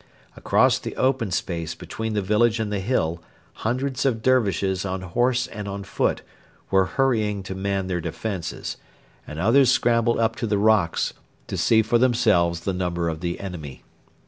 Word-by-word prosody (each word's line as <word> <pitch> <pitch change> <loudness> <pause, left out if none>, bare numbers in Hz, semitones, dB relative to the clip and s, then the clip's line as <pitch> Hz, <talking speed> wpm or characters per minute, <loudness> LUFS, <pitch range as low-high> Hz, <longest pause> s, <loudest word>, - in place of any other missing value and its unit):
Across - - +3
the - - -6
open 130 -4 +1
space 85 -2 -3
between 110 -1 -5
the 105 - 0
village 110 +3 +2
and 110 -2 -2
the 100 - 0
hill 85 -6 -1 0.4
hundreds 130 +3 -1
of 115 -5 0
Dervishes 100 -7 +2
on 95 -1 -3
horse 120 +7 +1
and 105 0 -7
on 100 0 -5
foot 100 - -1 0.5
were 95 -1 +4
hurrying 110 -7 +1
to 95 - -5
man 95 0 -2
their 90 -2 -2
defences, 90 -1 -4 0.5
and 75 - -7
others 120 +9 +4
scrambled 115 -2 +2
up 115 -1 +1
the 110 -3 0
rocks 105 -5 +2 0.3
to - - -5
see 110 -1 +3
for 115 +2 +2
themselves 105 -9 +2
the 95 +2 -2
numbers 85 -2 -1
of 80 - -6
the 85 0 -3
enemy. 85 -8 -7
100 Hz, 165 wpm, -24 LUFS, 90-115 Hz, 0.5 s, were